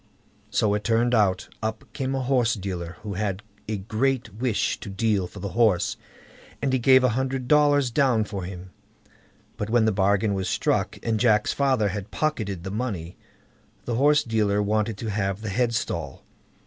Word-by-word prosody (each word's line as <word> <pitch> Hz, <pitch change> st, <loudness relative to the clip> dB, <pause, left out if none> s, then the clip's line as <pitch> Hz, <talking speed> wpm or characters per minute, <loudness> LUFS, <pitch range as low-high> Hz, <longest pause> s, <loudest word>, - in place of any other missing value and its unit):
So 105 Hz, -2 st, +1 dB
it 105 Hz, 0 st, -1 dB
turned 115 Hz, +1 st, +2 dB
out. 100 Hz, -5 st, +2 dB
Up 110 Hz, 0 st, -3 dB
came 135 Hz, 0 st, -2 dB
a 135 Hz, -, -1 dB
horse 125 Hz, -3 st, +2 dB
dealer, 90 Hz, -4 st, -5 dB
who 105 Hz, -2 st, -4 dB
had 100 Hz, 0 st, -2 dB, 0.2 s
a 110 Hz, -1 st, -2 dB
great 115 Hz, +3 st, -1 dB
wish 115 Hz, 0 st, -1 dB
to -, -, -8 dB
deal 100 Hz, -2 st, 0 dB
for -, -, -14 dB
the 100 Hz, -, -4 dB
horse, 110 Hz, -5 st, +2 dB, 0.6 s
and 135 Hz, -2 st, -1 dB
he 130 Hz, -, +2 dB
gave 130 Hz, +1 st, +6 dB
a 125 Hz, -, +4 dB
hundred 130 Hz, +1 st, -2 dB
dollars 145 Hz, -3 st, +4 dB
down 125 Hz, -4 st, +3 dB
for 100 Hz, -3 st, -5 dB
him; 90 Hz, 0 st, -8 dB, 0.9 s
but 105 Hz, -, -3 dB
when 115 Hz, -1 st, +3 dB
the 110 Hz, -, +3 dB
bargain 100 Hz, +1 st, +2 dB
was 95 Hz, -1 st, -2 dB
struck, -, -, 0 dB
and 110 Hz, -2 st, 0 dB
Jack's 105 Hz, -3 st, +3 dB
father 130 Hz, -7 st, +2 dB
had 100 Hz, +1 st, -5 dB
pocketed 105 Hz, -, -2 dB
the 95 Hz, -, -5 dB
money, 100 Hz, -7 st, -4 dB, 0.7 s
the 120 Hz, -, -2 dB
horse 145 Hz, +5 st, +4 dB
dealer 105 Hz, -3 st, +1 dB
wanted 105 Hz, +1 st, 0 dB
to 110 Hz, 0 st, -4 dB
have 100 Hz, -1 st, -2 dB
the 110 Hz, -, -4 dB
headstall. 115 Hz, +3 st, -2 dB
110 Hz, 175 wpm, -25 LUFS, 100-125 Hz, 0.9 s, gave